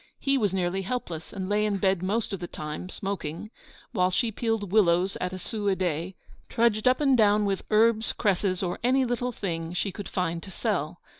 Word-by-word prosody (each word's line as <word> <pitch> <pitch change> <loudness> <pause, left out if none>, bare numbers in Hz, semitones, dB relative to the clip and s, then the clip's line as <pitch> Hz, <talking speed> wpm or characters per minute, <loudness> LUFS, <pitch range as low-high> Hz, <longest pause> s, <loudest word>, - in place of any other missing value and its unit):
He 275 0 +1
was 210 -8 +2
nearly 185 0 0
helpless, 180 -7 -4
and 190 -2 -4
lay 210 +1 +2
in 210 -2 +1
bed 190 -2 +2
most 205 +3 -1
of 195 - -3
the 175 - -5
time, 150 +4 -6
smoking, 195 0 -5 0.4
while 180 -5 +2
she 225 +5 0
peeled 225 -3 -2
willows 185 -2 +3
at 180 - -1
a 185 - -5
sou 205 +2 -4
a 195 - +3
day, 180 0 -2 0.3
trudged 230 -1 +2
up 255 +3 +4
and 275 -3 +4
down 210 -2 +4
with 195 -1 0
herbs, 220 +1 +3
cresses, 195 -3 0
or 175 -1 -2
any 260 +2 +3
little 245 +1 -1
thing 165 -6 -4
she 190 +2 -1
could 205 +2 -7
find 170 -2 -1
to 195 - -10
sell. 180 -5 -2
195 Hz, 205 wpm, -27 LUFS, 180-220 Hz, 0.4 s, up